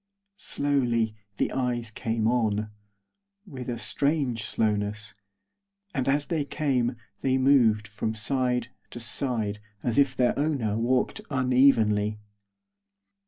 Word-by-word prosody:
Slowly 120 Hz, -6 st, +1 dB, 0.2 s
the -, -, 0 dB
eyes 120 Hz, -3 st, -2 dB
came 110 Hz, 0 st, -1 dB
on, 110 Hz, -3 st, +1 dB, 0.7 s
with 130 Hz, -, -7 dB
a 120 Hz, -, -2 dB
strange 130 Hz, -1 st, 0 dB
slowness, 105 Hz, 0 st, -1 dB, 0.8 s
and 135 Hz, -4 st, 0 dB
as 145 Hz, +1 st, +2 dB
they 160 Hz, -4 st, -1 dB
came 135 Hz, -5 st, 0 dB, 0.3 s
they 130 Hz, -1 st, +2 dB
moved 120 Hz, -6 st, +4 dB
from 110 Hz, +2 st, -3 dB
side 125 Hz, +1 st, 0 dB, 0.2 s
to 120 Hz, -, -8 dB
side 115 Hz, -3 st, -1 dB, 0.2 s
as 120 Hz, +2 st, +1 dB
if 135 Hz, -2 st, +3 dB
their 125 Hz, -2 st, +3 dB
owner 140 Hz, -9 st, 0 dB
walked 125 Hz, +3 st, 0 dB
unevenly. 125 Hz, -6 st, +3 dB
120 Hz, 115 wpm, -27 LUFS, 110-135 Hz, 0.8 s, moved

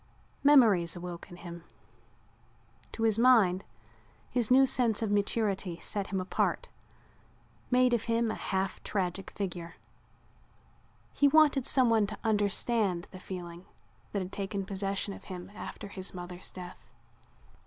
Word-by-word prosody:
Memories 220 Hz, -, +5 dB
awoke 175 Hz, -1 st, -7 dB
in 175 Hz, -, -11 dB
him. 170 Hz, -1 st, -9 dB, 1.3 s
To 225 Hz, -, -3 dB
his 225 Hz, -1 st, +3 dB
mind 220 Hz, -7 st, +5 dB, 0.7 s
his 240 Hz, -3 st, +1 dB
new 265 Hz, +1 st, +7 dB
sense 235 Hz, -4 st, +1 dB
of 215 Hz, -, -1 dB
maturity 200 Hz, -3 st, 0 dB
set 200 Hz, +2 st, -3 dB
him 195 Hz, -, -2 dB
apart, 185 Hz, 0 st, -1 dB, 1.0 s
made 250 Hz, 0 st, +4 dB
of 230 Hz, -2 st, 0 dB
him 230 Hz, -1 st, +1 dB
a -, -, -3 dB
half 190 Hz, 0 st, -2 dB
tragic 190 Hz, -1 st, -2 dB
figure. 175 Hz, -4 st, -5 dB, 1.4 s
He 285 Hz, -, +4 dB
wanted 290 Hz, -3 st, +4 dB
someone 230 Hz, -5 st, +4 dB
to 210 Hz, -, -6 dB
understand 205 Hz, -3 st, 0 dB
the 185 Hz, -, -10 dB
feeling 175 Hz, -1 st, -8 dB, 0.5 s
that 200 Hz, -2 st, -1 dB
had 185 Hz, -, -8 dB
taken 195 Hz, -1 st, -3 dB
possession 195 Hz, 0 st, -2 dB
of -, -, -12 dB
him 185 Hz, 0 st, -8 dB
after 210 Hz, -, -7 dB
his 190 Hz, -1 st, -5 dB
mother's 180 Hz, 0 st, -8 dB
death. 180 Hz, -10 st, -11 dB
200 Hz, 130 wpm, -30 LUFS, 180-230 Hz, 1.4 s, new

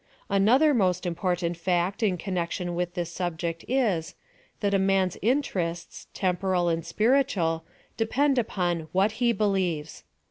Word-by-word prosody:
Another 240 Hz, +10 st, +4 dB
most 185 Hz, -6 st, +1 dB
important 175 Hz, 0 st, -1 dB
fact 180 Hz, +4 st, 0 dB
in 195 Hz, -5 st, +2 dB
connection 180 Hz, -1 st, -3 dB
witli 175 Hz, 0 st, -2 dB
this 175 Hz, -2 st, -3 dB
subject 170 Hz, -1 st, -3 dB
is, 215 Hz, -11 st, 0 dB, 0.5 s
that 200 Hz, -1 st, +1 dB
a 195 Hz, -, +3 dB
man's 190 Hz, -1 st, +2 dB
interests, 185 Hz, -9 st, -1 dB
temporal 180 Hz, -1 st, 0 dB
and 165 Hz, 0 st, -1 dB
spiritual, 210 Hz, -, +1 dB, 0.3 s
depend 265 Hz, +4 st, +2 dB
upon 175 Hz, -7 st, -1 dB
what 210 Hz, +5 st, +1 dB
lie 240 Hz, -1 st, +4 dB
believes. 185 Hz, -8 st, -1 dB
185 Hz, 130 wpm, -26 LUFS, 175-215 Hz, 0.5 s, Another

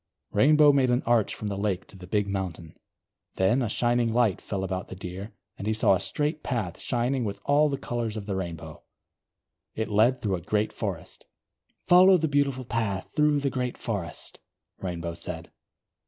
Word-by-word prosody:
Rainbow 150 Hz, 0 st, +6 dB
made 135 Hz, -2 st, +3 dB
an 125 Hz, +1 st, +2 dB
arch 115 Hz, -3 st, +2 dB
from -, -, -7 dB
the 100 Hz, -1 st, -2 dB
lake 95 Hz, -2 st, -1 dB
to -, -, -17 dB
the 90 Hz, -1 st, -11 dB
big 105 Hz, +1 st, 0 dB
mountain. 90 Hz, -5 st, -4 dB, 0.6 s
Then 100 Hz, +8 st, +2 dB
a 120 Hz, -, -1 dB
shining 120 Hz, +1 st, +1 dB
light 115 Hz, -4 st, +2 dB
fell 95 Hz, -2 st, -4 dB
about 95 Hz, 0 st, -3 dB
the -, -, -8 dB
Deer, 95 Hz, +3 st, -7 dB, 0.3 s
and 100 Hz, -, -4 dB
he 110 Hz, -, +1 dB
saw 110 Hz, -, +4 dB
a 95 Hz, -, +2 dB
straight 150 Hz, +1 st, -1 dB
path 105 Hz, -10 st, -3 dB
shining 125 Hz, +1 st, 0 dB
with 100 Hz, -2 st, -4 dB
all 150 Hz, +1 st, +4 dB
the 140 Hz, -, -2 dB
colours 115 Hz, -4 st, -3 dB
of 105 Hz, -, -5 dB
the 100 Hz, -2 st, -3 dB
Rainbow. 85 Hz, -4 st, -6 dB, 0.9 s
It 110 Hz, -, -2 dB
led 115 Hz, +5 st, +3 dB
through 100 Hz, -4 st, -1 dB
a -, -, -9 dB
great 105 Hz, +4 st, 0 dB
forest. -, -, -6 dB, 0.6 s
"Follow 185 Hz, +1 st, +7 dB
the 160 Hz, -1 st, 0 dB
beautiful 140 Hz, -3 st, 0 dB
path 110 Hz, -5 st, -2 dB
through 150 Hz, -1 st, +3 dB
the 140 Hz, -1 st, 0 dB
great 125 Hz, -1 st, -2 dB
forest," 95 Hz, -8 st, -5 dB, 0.4 s
Rainbow 85 Hz, -2 st, -4 dB
said. -, -, -7 dB
110 Hz, 185 wpm, -27 LUFS, 95-130 Hz, 0.9 s, Follow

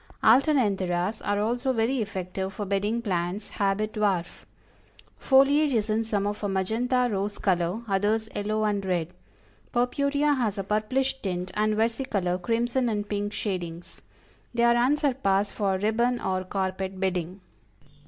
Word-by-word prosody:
ALTERNANTHERAS 210 Hz, -, +3 dB
are 205 Hz, 0 st, 0 dB
also 245 Hz, +5 st, 0 dB
very 235 Hz, +2 st, +1 dB
effective 190 Hz, -2 st, -4 dB
for 205 Hz, +1 st, -5 dB
bedding 205 Hz, +4 st, -1 dB
plants; 185 Hz, 0 st, -2 dB
habit 205 Hz, +2 st, -1 dB
dwarf. 195 Hz, -5 st, -1 dB, 0.7 s
Foliage 280 Hz, +2 st, +4 dB
is 220 Hz, -2 st, +1 dB
in 220 Hz, +1 st, +1 dB
some 210 Hz, -3 st, -1 dB
of 205 Hz, +1 st, -3 dB
a 205 Hz, -, 0 dB
magenta 235 Hz, +7 st, +1 dB
rose 200 Hz, +1 st, -2 dB
color, 180 Hz, +3 st, 0 dB
others, 210 Hz, +3 st, +1 dB
yellow 215 Hz, +1 st, -1 dB
and 205 Hz, -2 st, 0 dB
red; 175 Hz, -4 st, -1 dB, 0.6 s
Purpurea 280 Hz, +4 st, +1 dB
has 225 Hz, -7 st, -1 dB
a 195 Hz, -, -2 dB
purplish 255 Hz, +7 st, 0 dB
tint, 180 Hz, -1 st, -3 dB
and 215 Hz, 0 st, +1 dB
Versicolor, 215 Hz, -6 st, 0 dB
crimson 235 Hz, +5 st, 0 dB
and 205 Hz, -2 st, -2 dB
pink 205 Hz, 0 st, -2 dB
shadings. 175 Hz, -5 st, -5 dB, 0.5 s
They 235 Hz, -, +2 dB
are 235 Hz, 0 st, +6 dB
unsurpassed 245 Hz, -6 st, +1 dB
for 195 Hz, -3 st, 0 dB
ribbon 235 Hz, +5 st, +1 dB
or 185 Hz, -2 st, -2 dB
carpet 190 Hz, 0 st, -3 dB
bedding. 185 Hz, -1 st, -2 dB
210 Hz, 140 wpm, -26 LUFS, 190-235 Hz, 0.7 s, are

